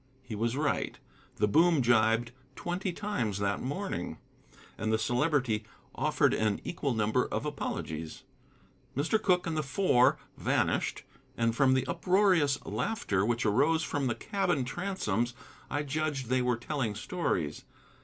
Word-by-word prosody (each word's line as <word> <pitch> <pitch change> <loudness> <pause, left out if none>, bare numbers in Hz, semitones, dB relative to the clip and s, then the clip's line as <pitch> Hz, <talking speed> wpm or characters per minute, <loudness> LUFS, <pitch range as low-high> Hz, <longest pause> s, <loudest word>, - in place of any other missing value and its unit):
He 130 - -8
was 115 +4 -1
right. 145 -2 0 0.4
The 105 - +2
boom 160 +4 +4
gybed 115 0 +3 0.3
twenty 180 +2 -2
times 170 - -2
that 100 0 -1
morning, 145 - -3 0.6
and 110 0 -2
the 110 - +3
Celebrity 120 -2 +1 0.3
offered - - +2
an 105 -2 +1
equal 140 -7 -2
number 110 +3 +1
of - - -3
apologies. 80 - -4 0.7
Mr. 165 +10 +2
Cooke 180 -3 +2
and 165 -2 -2
the 155 - +1
Four 140 -3 +3 0.2
vanished, - - 0 0.3
and 115 -1 +1
from 130 +1 +4
the 130 - +1
uproarious 180 -7 +3
laughter 110 - -1
which 115 +1 0
arose 145 +10 +3
from 145 -4 -1
the 120 - 0
cabin 195 -10 0
transoms 125 - -2 0.3
I 145 - -1
judged 145 -3 -2
they 130 0 +2
were 125 -1 +1
telling 120 -3 -2
stories. 100 - -2
130 Hz, 140 wpm, -30 LUFS, 110-160 Hz, 0.7 s, boom